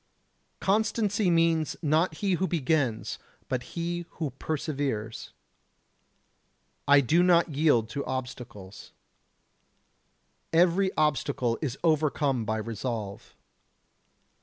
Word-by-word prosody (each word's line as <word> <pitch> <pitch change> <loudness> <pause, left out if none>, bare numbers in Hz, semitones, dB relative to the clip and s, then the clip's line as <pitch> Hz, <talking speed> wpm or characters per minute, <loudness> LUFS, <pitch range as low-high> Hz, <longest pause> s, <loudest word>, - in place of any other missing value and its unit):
Constancy 210 -1 +1
means, 165 -2 +2
not 155 +2 +2
he 195 - +2
who 185 +2 0
begins, 145 -8 -1 0.3
but 130 -2 -1 0.2
he 170 0 -3
who 155 -4 -3
perseveres. 140 -8 -3 1.6
I 140 0 +7
do 155 +7 +3
not 175 -1 +4
yield 145 -6 +2
to 140 +1 -3
obstacles. 125 -7 -7 1.6
Every 180 +3 +3
obstacle 130 -6 0
is 140 -4 -3
overcome 150 -6 +1
by 110 +1 -1
resolve. 110 -2 -5
150 Hz, 90 wpm, -27 LUFS, 125-170 Hz, 1.6 s, I